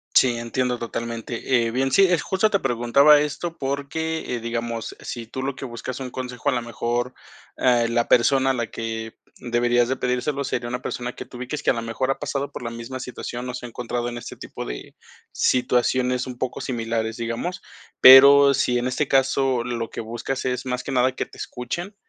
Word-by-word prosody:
Sí, 120 -2 +5
entiendo 125 +1 -1
totalmente. 115 +1 -2
Eh, 115 - -1
bien, 135 +3 0
sí, 195 - +6
eh, 180 -3 +4
justo 190 +7 +1
te 200 - +2
preguntaba 135 +3 +5
esto, 160 +3 -3
porque, 140 +2 -3
eh, - - -3
digamos, 115 -1 -4
si 120 -2 -6
tú 130 +4 -6
lo 135 0 -2
que 135 - -7
buscas 120 +1 -6
un 130 -2 -6
consejo, 125 +2 -3
a - - +3
lo 125 -2 0
mejor, 120 +1 -2 0.4
eh, 120 -2 +3
la 120 0 +1
persona 135 +2 +4
a - - 0
la 120 -3 -2
que 115 0 -5 0.2
deberías 120 0 +1
de 130 - +1
pedírselo 125 +3 -1
sería 120 -2 -3
una 125 +1 -4
persona 125 0 -4
que - - -7
tu 125 - -12
ubiques 130 +5 -5
que - - +4
a - - +1
lo 115 - -3
mejor 115 +4 -1
ha - - -3
pasado 140 0 -3
por - - -7
la 115 - -4
misma 115 +3 -7
situación, 125 0 -6
o 125 - -4
se 125 - -7
ha - - -7
encontrado 120 +1 -3
en 120 0 -5
este - - -9
tipo - - -7
de - - -8 0.4
situaciones 125 0 +1
un 125 -1 -7
poco 130 - -3
similares, 115 -2 -2
digamos. 115 +11 -4 0.4
Pero 140 +2 +9
si 125 -2 +1
en 120 - -1
este 130 +3 -1
caso 135 -2 +2
lo 120 -2 -3
que - - -7
buscas 120 +4 -4
es 125 0 -2
más 125 0 -2
que - - -5
nada 130 0 +2
que - - -2
te - - -16
escuchen, 175 - -5
125 Hz, 210 wpm, -23 LUFS, 120-135 Hz, 0.4 s, Pero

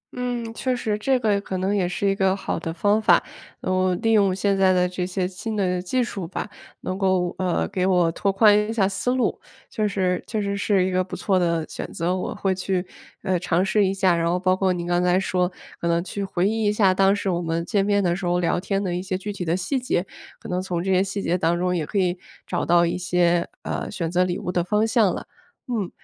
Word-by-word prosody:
嗯， 245 -2 -3
确 255 +2 -1
实 220 -4 -1
这 265 +4 +2
个 205 -3 +1
可 190 -2 -4
能 190 +2 0
也 185 -3 +1
是 200 +3 -1
一 195 - +3
个 190 -1 +2
好 190 -3 -3
的 165 - -4
方 205 +6 +1
法。 - - +5 0.4
嗯， 185 -1 +1
利 225 - +3
用 200 -4 +4
现 200 +1 +1
在 190 -1 +4
的 180 0 +3
这 180 0 -3
些 185 0 -1
新 205 +4 -5
的 180 -3 0
技 250 +8 0
术 195 -7 -5
吧， 190 - -4 0.3
能 185 +1 -4
够， 185 -2 +1
呃， 185 -2 0
给 185 0 0
我 175 -3 +3
拓 195 +4 0
宽 205 +1 +5
一 - - -1
下 200 -4 +2
思 200 +6 -1
路， 255 - 0 0.3
就 215 -1 0
是 185 -3 0
确 220 - -2
实 200 -1 -1
是 200 -2 +2
一 190 - -1
个 185 0 +1
不 185 - -7
错 190 -2 +1
的 170 -2 0
选 - - -7
择， 175 +2 -1
我 185 - -4
会 195 -1 0
去， 185 0 -2 0.4
呃， 185 -2 +1
尝 175 +1 +1
试 205 +1 +2
一 - - +1
下。 190 -2 +2
然 170 0 0
后 180 - +1
包 185 0 +2
括 190 -1 +1
您 175 -1 -3
刚 175 0 +1
才 180 +1 +3
说 180 -1 0 0.3
可 170 - -1
能 170 0 +1
去 200 +1 -4
回 190 0 0
忆 220 0 0
一 205 - +3
下 200 -3 +3
当 195 +1 +4
时 205 - -4
我 175 - -1
们 165 0 -2
见 200 -1 +1
面 205 0 +2
的 175 -1 +1
时 190 - -7
候 175 0 +2
聊 175 0 +1
天 195 +1 -1
的 175 -2 -2
一 180 - -2
些 185 0 -3
具 205 +2 -5
体 190 - -5
的 170 +1 0
细 260 +9 -1
节， 245 -7 -1 0.3
可 - - -10
能 180 0 -1
从 180 -2 -3
这 190 - 0
些 185 0 +4
细 195 0 -4
节 175 - +1
当 170 +1 +1
中 180 0 0
也 160 -4 -2
可 205 - -3
以 180 -2 +2 0.3
找 - - -2
到 170 0 +4
一 170 - -1
些， 175 -1 +2 0.2
呃， - - -3
选 165 -1 -3
择 180 0 +3
礼 180 0 -1
物 200 -3 -4
的 175 -1 0
方 210 +5 +1
向 220 -5 +3
了。 - - -6 0.4
嗯， 225 - -2
185 Hz, 275 characters per minute, -23 LUFS, 180-200 Hz, 0.4 s, 法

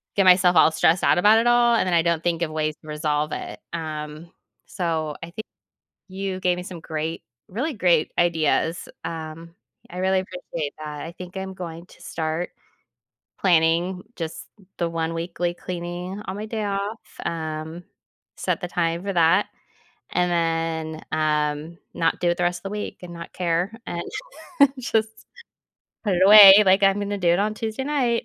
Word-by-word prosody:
get 195 - +3
myself 180 -1 +6
all 160 0 +6
stressed 165 +2 +2
out - - +4
about 210 +5 +6
it 235 - +1
all, 240 0 +5
and 205 - +1
then 180 - 0
I 170 - +5
don't 170 -1 0
think 170 -1 0
of 165 -2 -1
ways 155 -1 -1
to 155 - -16
resolve 150 0 -1
it. - - -6
Um, 155 0 -6 0.3
so 160 -5 -2
I - - -5
think 205 +6 -8 0.6
you 190 0 -4
gave 180 -1 +1
me 180 - -5
some 180 -2 -8
great 160 +1 -4 0.2
really 265 - -3
great 175 -6 +2
ideas. 165 -1 +1 0.2
Um, 165 +1 -7 0.3
I 180 - -9
really 190 0 +2
appreciate 170 -5 -5
that. 150 -1 -7
I 165 - -7
think 180 +1 -9
I'm 190 0 -5
going 170 -2 -8
to - - -19
start 160 +2 -3 0.9
planning 175 +1 +2
just 165 -2 -6 0.3
the 170 - 0
one 165 0 -2
weekly 170 +1 -2
cleaning 180 +3 -6
on 190 - -4
my 215 +1 -5
day 220 -1 -3
off, 200 +2 -3 0.3
um, 160 +1 -4 0.5
set - - -1
the 180 - -4
time 170 -1 -1
for 195 0 -3
that, 175 +3 +4 0.6
and 180 - +2
then, 165 -2 -1
um, 150 +1 -1 0.2
not 165 -1 +1
do 175 - +2
it 175 - 0
the - - 0
rest 175 0 0
of - - -33
the 195 - -4
week 210 0 -5
and 175 -1 -8
not 170 0 -9
care 175 +2 0 0.2
and 170 - -3 0.8
just 220 -3 0 1.0
put 200 -4 +1
it 180 - +2
away. 205 0 +11
Like, 195 +1 +4
I'm 195 +1 +3
gonna 205 0 -2
do 180 -3 +1
it 175 - +3
on 210 +1 0
Tuesday 220 +3 -4
night. 255 -5 0
175 Hz, 180 wpm, -23 LUFS, 160-190 Hz, 1.0 s, away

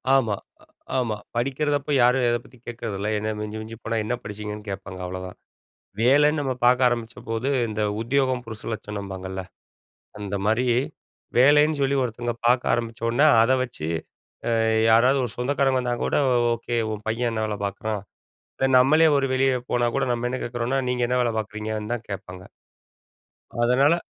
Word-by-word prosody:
ஆமா, 115 -6 +2 0.3
அ - - -19 0.3
ஆமா. 115 -4 0 0.2
படிக்கிறதப்போ 145 +3 -1
யாரும் 125 +1 +4
எதை 120 0 +1
பத்தி 125 - -18
கேட்குறதில்ல, 105 -4 -4
என்னா 110 +1 -2
மிஞ்சி 105 +1 -5
மிஞ்சி 110 +1 -8
போனா 115 0 -1
என்ன 125 - -1
படிச்சீங்கன்னு? 105 0 -6
கேட்பாங்க 95 -1 -6
அவ்ளோதான். 95 0 -6 0.6
வேலன்னு 145 +5 +4
நம்ம 135 -2 -1
பாக்க 125 +1 +5
ஆரம்பிச்சபோது, 120 +1 -3 0.2
இந்த 110 0 -3 0.2
உத்தியோகம் 130 0 +1
புருஷலட்சணம்பாங்கல்ல. 100 -4 -6 0.8
அந்த 100 -1 -5
மாரி 115 +4 +2 0.7
வேலைன்னு 150 +3 +5
சொல்லி 140 +1 +2
ஒருத்தவங்க 120 0 -3
பாக்க 125 +1 +4
ஆரம்பிச்சோன்னே, 115 +4 +1 0.2
அத 130 +3 +3
வச்சு, 100 -11 -5 0.6
அ - - +1 0.4
யாராவது 125 +5 +5
ஒரு 120 - -4
சொந்தக்காரங்க 135 +1 +1
வந்தா 120 -1 -1
கூட, - - 0 0.4
"ஓகே 120 +1 -4 0.2
உன் 105 0 -7
பையன் 120 +1 0
என்ன 110 -1 -1
வேல 105 -1 -3
பாக்குறான்?" 100 +1 -4 0.6
இல்ல 135 - +2
நம்மளே 155 +5 +5
ஒரு 135 - +1
வெளிய 135 0 +3 0.2
போனா 120 -1 +2
கூட, 135 - +2
நம்ம 120 +1 -1
என்ன 130 - -3
கேட்குறோம்னா, 120 +3 -1
நீங்க 125 -1 0
என்ன 125 0 +1
வேல 120 -1 0
பாக்குறீங்கன்னு? 110 +1 -4
தான் 115 -2 -7
கேட்பாங்க. 90 -1 -7 1.2
அதனால 135 +7 +4
120 Hz, 150 wpm, -24 LUFS, 105-130 Hz, 1.2 s, பாக்க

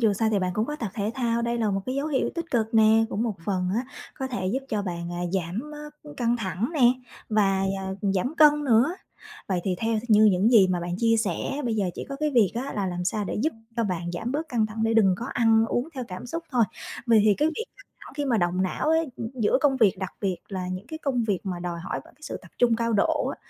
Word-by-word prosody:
dù 220 -3 +4
sao 220 +2 +1
thì 205 - +2
bạn 185 -1 -1
cũng 215 +3 0
có 295 - -4
tập 225 -8 -4
thể 210 0 -1
thao, 235 -3 0
đây 235 0 -1
là 220 -3 +1
một 195 0 0
cái 255 - -2
dấu 280 +2 -1
hiệu 280 -4 0
tích 335 -1 -5
cực 225 -2 0
nè, 220 0 +6
cũng 220 - -2
một 225 -4 -1
phần 185 -2 0
á 245 +3 0 0.3
có 265 - -2
thể 245 -8 -3
giúp 220 +8 0
cho 210 -2 -1
bạn, 175 -2 -4
à, 175 - -4
giảm, 190 - -2
á, 295 - -8 0.4
căng 240 -1 +1
thẳng 205 - -2
nè 290 - -1 0.5
và 195 -3 +2 0.5
giảm 250 - -1
cân 295 -1 +6
nữa. 255 +6 +4 0.5
Vậy 180 -2 0
thì 185 -2 0
theo 225 -1 0
th 235 +1 -10
như 215 0 +7
những 190 +5 +3
gì 215 -6 +7
mà 180 -1 0
bạn 175 0 -3
chia 230 -1 +3
sẻ 220 - -1
bây 230 -2 0
giờ 205 - +1
chỉ - - -5
có 275 - -5
cái 300 +1 0
việc 230 -8 +4
á 260 +4 -3
là 200 -2 -1
làm 180 0 -3
sao 210 +2 -1
để - - -3
giúp 315 - +1 0.2
cho 230 - +1
bạn 175 -3 -2
giảm 225 +8 -3
bớt 315 +3 -2
căng 225 -5 +1
thẳng 220 +1 -5
để 225 0 +2
đừng 200 -5 +5
có 235 - -4
ăn 225 -3 +3
uống 245 +6 -1
theo 255 -2 -4
cảm 185 +5 -7
xúc 330 +7 -4
thôi. 245 -4 +4 0.4
Vậy 225 -2 +6
thì 210 -2 +5
cái 300 +7 +2
việc 450 +8 -4
căng - - -17
thẳng - - -12
khi 290 - -1
mà 245 -4 +2
động 175 +1 +1
não 185 - -1
ấy 320 0 +3 0.3
giữa 235 +1 +2
công 280 -2 +3
việc, 205 -7 +3
đặc 190 -2 -4
biệt 190 -3 0
là 185 -2 -4
những 185 +4 -5
cái 315 +3 -7
công 255 -6 0
việc 200 -4 0
mà 180 -2 -2
đòi 175 -1 -4
hỏi 185 - -4
vào - - -18
cái 305 - -32
sự - - -5
tập - - -15
trung 235 -2 +4
cao 230 0 0
độ 200 - +2
á, - - -4
225 Hz, 275 wpm, -26 LUFS, 190-250 Hz, 0.5 s, như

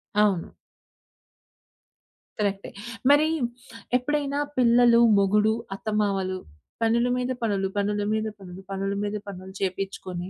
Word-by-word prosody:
అవును. 205 -5 +2 1.9
కరెక్టే. 200 -1 -1 0.4
మరీ 295 +2 +5 0.7
ఎప్పుడైనా 285 +2 -1 0.2
పిల్లలు, 240 -1 +5 0.2
మొగుడు, 210 +2 +3 0.2
అత్తమావలు, 195 -3 -1 0.4
పనుల 235 +2 +3
మీద 250 +1 -1
పనులు, 200 -4 0
పనుల 205 +1 0
మీద 220 0 0
పనులు, 185 -1 -10
పనుల 195 0 -2
మీద 205 +1 -2
పనులు 190 -1 -8
చేపిచ్చుకొని, 185 -2 -4
205 Hz, 100 wpm, -25 LUFS, 195-235 Hz, 1.9 s, మరీ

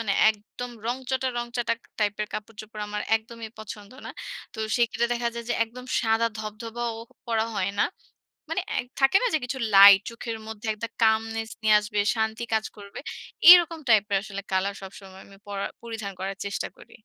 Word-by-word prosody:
মানে 210 -3 0 0.2
একদম 220 +3 -8 0.2
রংচটা 260 +1 -1
রংচটা 240 -1 -1 0.3
টাইপের 210 0 0
কাপড়-চোপড়, 215 0 -7
আমার 210 0 -3
একদমই 225 0 -9
পছন্দ 210 -1 -9 0.2
না। - - -5 0.4
তো - - -12 0.2
সেখানে 235 -1 +1
দেখা 235 0 0
যায় 235 - -5
যে, - - +1
একদম 250 +3 -11 0.2
সাদা 225 0 +2
ধবধবাও 225 +2 -4 0.3
পরা 225 -1 +1
হয় 200 -1 0
না। - - +5 0.6
মানে - - 0 0.2
এ - - +3 0.2
থাকে 270 +7 +5
না - - +3
যে - - +4
কিছু 265 +2 -4 0.2
লাইট 195 0 +10
চোখের 230 -1 -5
মধ্যে 220 0 -7
একটা 225 +2 -5
কামনেস 225 0 +2
নিয়ে 215 -1 +5
আসবে, 210 0 -4 0.2
শান্তি 220 +1 -1
কাজ 220 0 +1
করবে। 200 -1 -10 0.5
এরকম 345 -2 +8
টাইপের 210 -3 +4
আসলে 200 -2 -6
কালার 195 +1 +1
সবসময় 190 0 -11
আমি 195 - -16
পরার 200 -1 -3
পরিধান 225 -4 -5
করার 195 +1 -4
চেষ্টা 200 - -3
করি। - - -16
220 Hz, 170 wpm, -26 LUFS, 205-235 Hz, 0.6 s, লাইট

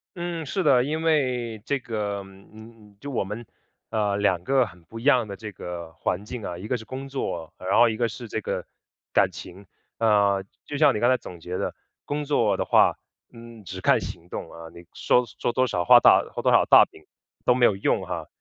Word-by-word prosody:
嗯， 170 -2 -4
是 190 +8 -2
的。 135 -7 +4
因 155 +4 -2
为 125 -8 0
这 140 -1 0
个 105 -4 -3
嗯， 105 +2 -16
就 145 - -7
我 125 - -1
们， 105 +5 -6 0.5
呃， 105 -3 0
两 95 -4 +1
个 135 +2 +3
很 90 -4 -16
不 115 +7 -10
一 - - -10
样 125 -6 +4
的 100 - -6
这 105 0 -8
个 85 -2 -7
环 90 +4 -2
境 115 0 -7
啊， 85 - -4
一 95 +5 -8
个 125 - 0
是 110 - -11
工 135 +1 -7
作， 85 - -4
然 95 +2 -1
后 120 - +6
一 110 - -3
个 120 0 +1
是 115 +2 -8
这 110 - -3
个 - - -3 0.5
感 - - +3
情。 95 +3 -11 0.3
呃， 100 -3 +3 0.2
就 145 - -5
像 150 - +5
你 - - -1
刚 120 - +3
才 130 - +4
总 90 -6 -11
结 90 +2 -5
的， - - -3 0.3
工 145 +1 -2
作 115 -9 +2
的 - - 0
话， - - +4 0.4
嗯， 115 -2 -12
只 95 +1 -8
看 - - +4
行 85 0 -8
动 - - -6
啊， 85 0 -10
你 85 0 -14
说 125 - +2 0.2
说 - - 0
多 130 +2 +2
少， 90 -7 -1
画 - - +8
大 - - +6
画 - - -5
多 - - +3
少 - - +6
大 - - +8
饼 80 - -19 0.4
都 125 - +4
没 125 -1 +4
有 105 - +3
用 95 - 0
哈， - - -5
110 Hz, 240 characters per minute, -25 LUFS, 95-125 Hz, 0.5 s, 画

